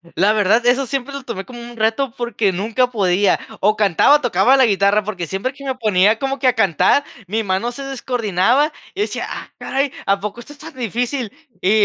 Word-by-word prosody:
La 205 +4 +3
verdad, 215 +3 +3
eso 255 +2 +3
siempre 275 +2 -4
lo 275 -2 -6
tomé 220 -6 -6
como 245 -2 -10
un 235 0 -10
reto 225 +3 0
porque 230 -4 -1
nunca 225 +7 0
podía, 195 -3 +2 0.2
o 210 +2 +2
cantaba 210 - +4
o 295 - -14
tocaba 240 +2 +3
la 265 -1 +5
guitarra, 200 0 +2
porque 190 -4 -4
siempre 195 +9 -3
que 275 +1 -12
me 265 - -1
ponía 215 -2 +2
como 270 0 -2
que 260 -1 0
a 250 - +4
cantar, 195 - +3 0.2
mi 220 +4 -1
mano 200 +4 -1
se 275 +3 -8
descoordinaba, 250 - 0 0.2
yo 400 - -3
decía: 420 - -2
"Ah, - - -7
caray, 275 0 -1
¿a 195 0 +2
poco 210 +4 -6
esto 290 - -12
es 290 - -21
tan 320 -1 -11
difícil?". 245 0 -3 0.3
Y 190 - +1
230 Hz, 215 wpm, -19 LUFS, 200-260 Hz, 0.3 s, la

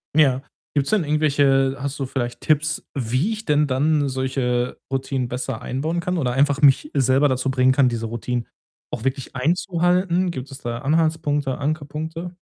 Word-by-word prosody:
Ja, 135 -4 +4 0.3
gibt's 140 -2 +1
denn 210 -6 +2
irgendwelche 140 -3 +2
hast 140 +1 -4
du 135 - -2
vielleicht 120 -2 -4
Tipps, 155 0 +1
wie 130 - 0
ich 220 0 -5
denn 150 0 +3
dann 145 +2 +1
solche 130 -2 -1
Routinen 130 -2 -2
besser 125 -1 -4
einbauen 160 +7 -2
kann 180 +1 -1
oder 125 -6 0
einfach 140 +2 +2
mich 145 +1 +4
selber 135 +1 +3
dazu 130 +1 0
bringen 130 0 +3
kann, 130 -1 +4
diese 115 -2 -2
Routinen 120 +1 -3 0.5
auch 120 - -5
wirklich 135 0 -3
einzuhalten? 175 +3 +1
Gibt 130 -1 -7
es 135 - -8
da 120 -1 -4
Anhaltspunkte, 150 -2 0
Ankerpunkte? 155 +4 -4
140 Hz, 165 wpm, -22 LUFS, 130-155 Hz, 0.5 s, Ja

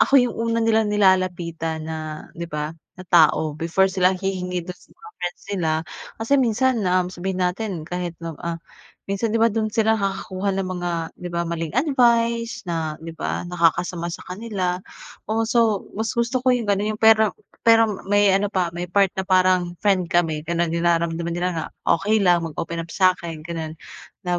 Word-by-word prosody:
ako 275 - +5
yung 245 -3 +4
una 230 0 -1
nilang 220 -1 +3
nilalapitan, 175 -5 +1
na 160 0 -4 0.4
'di 170 0 -6
ba, 150 0 -3 0.2
na 185 - -10
tao, 160 -3 +4
before 165 +5 +1
sila 185 0 +3
hihingi 180 -2 -3
dun 180 - -6
sa - - -23
mga 440 -1 -13
friends 175 0 -4
nila. 175 -5 0 0.5
Kasi 225 +4 -3
minsan, 245 0 +2
um, 180 0 +2
sabihin 185 +1 -2
natin 180 -2 -2
kahit 175 0 -4
na, 165 - -4
ah, 170 -1 -3 0.5
minsan 200 +3 -1
'di 230 - +2
ba, 230 -1 +4
dun 215 0 0
sila 220 +1 +2
nakakakuha 195 0 -2
ng 190 -1 -2
mga 175 -1 -3 0.3
'di 180 - -5
ba, 170 0 -2
maling 165 -2 -3
advice 235 -4 +2
na 165 -3 -3
'di 165 +1 -9
ba, 165 - -3
nakakasama 175 0 0
sa 170 - -7
kanila 185 -2 -3 0.5
o 225 +1 +1
so, 225 -3 +2
mas 220 +2 -2
gusto 235 +2 +1
ko 260 - 0
yung 235 - -3
ganun 205 +2 +1
yung - - -26
pero 220 -1 +5 0.3
pero 225 -1 +6 0.2
may 205 0 +4
ano 195 +2 +2
pa, 185 -4 0
may 175 +1 -4
part 195 +1 +3
na 190 - 0
parang 185 -2 +3
friend 190 -4 +3
kami, 160 -3 +1
ganon 170 0 0
naramdaman 170 0 0
nila 180 +1 0
na 165 -2 -3 0.4
okey 215 +3 +2
lang 175 -3 +3
mag-open 165 +1 -5
up 170 - -15
sa'kin 175 -4 +1
ganon. 160 -2 -5 0.5
Na 175 0 0
185 Hz, 180 wpm, -22 LUFS, 170-215 Hz, 0.5 s, pero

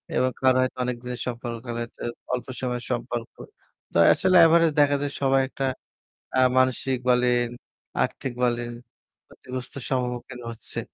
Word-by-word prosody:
এবং 130 0 +2
কারো 130 -1 +5
হয়তো 130 - -1
অনেক 125 0 -1
দিনের 125 0 -5
সম্পর্ক, 120 -1 -4
কারো 120 -1 -4
হয়তো 120 - -8 0.3
অল্প 125 - -2
সময়ের 125 -1 -2
সম্পর্ক। 120 -1 -3 0.6
তো - - -1 0.2
আসলে 185 -1 +2
average 165 -1 +5
দেখা 145 -1 +5
যায় 145 -1 -2
সবাই 135 0 +4
একটা 135 0 -3 0.7
অ্যা 130 - +3 0.2
মানসিক 130 0 +2
বলেন, 125 -1 +3 0.6
আর্থিক 135 - -4
বলেন, 120 -1 0 0.6
ক্ষতিগ্রস্ত 130 0 -8 0.2
সম্মুখীন 125 -1 -2
হচ্ছে। 115 - -7
125 Hz, 145 wpm, -25 LUFS, 120-130 Hz, 0.7 s, কারো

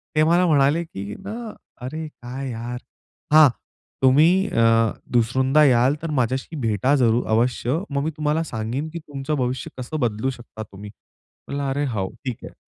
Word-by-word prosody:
ते 155 - +4
मला 175 +3 +4
म्हणाले 150 0 +3
की 100 -10 -7
ना, 220 +3 -6 0.3
अरे 155 +4 -5
काय? 130 -1 -7
यार! 120 +1 -5 0.6
हां, 155 -3 +9 0.5
"तुम्ही 160 +9 +5
अ 115 - +2 0.5
दुसऱ्यांदा 130 +5 +3
याल, 130 +1 +4
तर 165 - -4
माझ्याशी 130 +6 -1
भेटा 115 +5 +2
जरूर 120 -3 +2
अवश्य. 120 +4 +1
मग 140 -1 -1
मी 160 - -1
तुम्हाला 155 +1 0
सांगेन 125 +2 -4
की 170 - -4
तुमचं 145 0 -4
भविष्य 125 0 -2
कसं 130 +5 -4
बदलू 115 0 0
शकता 110 -2 -9
तुम्ही?" 100 +2 -9 0.6
म्हणलं, 140 0 -3
"अरे 145 +2 0
हो, 95 -3 -1 0.2
ठीक 125 -3 -4
आहे." - - -11
135 Hz, 160 wpm, -23 LUFS, 120-155 Hz, 0.6 s, हां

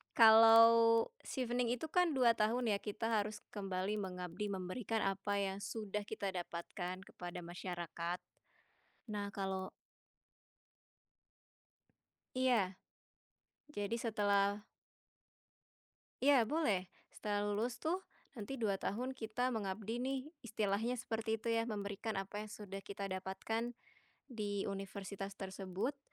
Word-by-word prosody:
Kalo 230 - +8
Chevening 245 -2 0
itu 310 +5 -6
kan 360 -3 +4
2 245 -3 +6
tahun 230 +2 +2
ya, 200 - +3
kita 215 +2 -3
harus 210 -1 0
kembali 195 0 -2
mengabdi 180 0 -4
memberikan 200 +4 -2
apa 195 +1 0
yang 195 0 -1
sudah 210 -1 -3
kita 200 -3 -2
dapatkan 180 +1 -4
kepada 175 -2 -7
masyarakat. 175 0 -4 0.9
Nah, 205 -1 -2
kalo 190 -1 -2 2.7
Iya. 240 -8 +3 1.0
Jadi 205 +1 -1
setelah 205 -2 +2 1.6
Iya, 260 -4 +5
boleh. 215 - +1 0.2
Setelah 205 -1 -1
lulus 215 +4 0
tuh, 345 +4 -1 0.3
nanti 250 +2 -5
2 220 -4 +1
tahun 250 +6 -1
kita 245 +2 -1
mengabdi 215 +2 -2
nih, 265 +1 0 0.2
istilahnya 220 +2 0
seperti 225 -2 -1
itu 230 +1 -1
ya, 230 - +3
memberikan 205 +1 -3
apa 195 +2 -3
yang 215 - -7
sudah 200 -2 -7
kita 200 0 -5
dapatkan 190 +5 -2 0.6
di 205 -4 -2
universitas 195 0 -5
tersebut, 195 +6 -3
210 Hz, 110 wpm, -37 LUFS, 195-230 Hz, 2.7 s, Kalo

